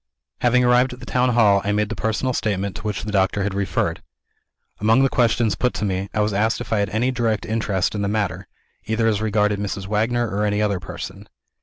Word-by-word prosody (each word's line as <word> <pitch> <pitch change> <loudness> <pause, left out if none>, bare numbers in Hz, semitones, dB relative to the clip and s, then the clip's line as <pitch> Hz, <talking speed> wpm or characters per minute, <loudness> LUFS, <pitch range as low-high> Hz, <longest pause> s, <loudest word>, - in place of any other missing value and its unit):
Having 125 +1 +3
arrived 125 +1 +3
at 125 - -11
the 125 - -10
town 125 0 +1
hall, 100 -4 +5
I 100 - 0
made 105 0 0
the 115 - -3
personal 110 +5 -1
statement 100 -4 -2
to - - -8
which 105 -2 -3
the 105 - -4
doctor 95 0 +1
had 100 0 -2
referred. 95 -3 -1 0.8
Among 110 +5 +4
the 135 - +3
questions 115 -3 +2
put 125 - -1
to - - -2
me, 95 0 -2
I 105 - 0
was 105 0 0
asked 110 +3 +1
if 115 -3 -4
I 110 - +2
had 100 - 0
any 120 +4 0
direct 115 -4 -1
interest 105 -4 -1
in 105 - -2
the 100 - 0
matter 105 -1 -2 0.4
either 110 +1 0
as 110 -2 +1
regarded 105 -1 +1
Mrs. 100 -1 -4
Wagner 115 +4 0
or 105 0 -2
any 105 0 0
other 100 -3 +1
person. - - -8
105 Hz, 225 wpm, -22 LUFS, 100-115 Hz, 0.8 s, hall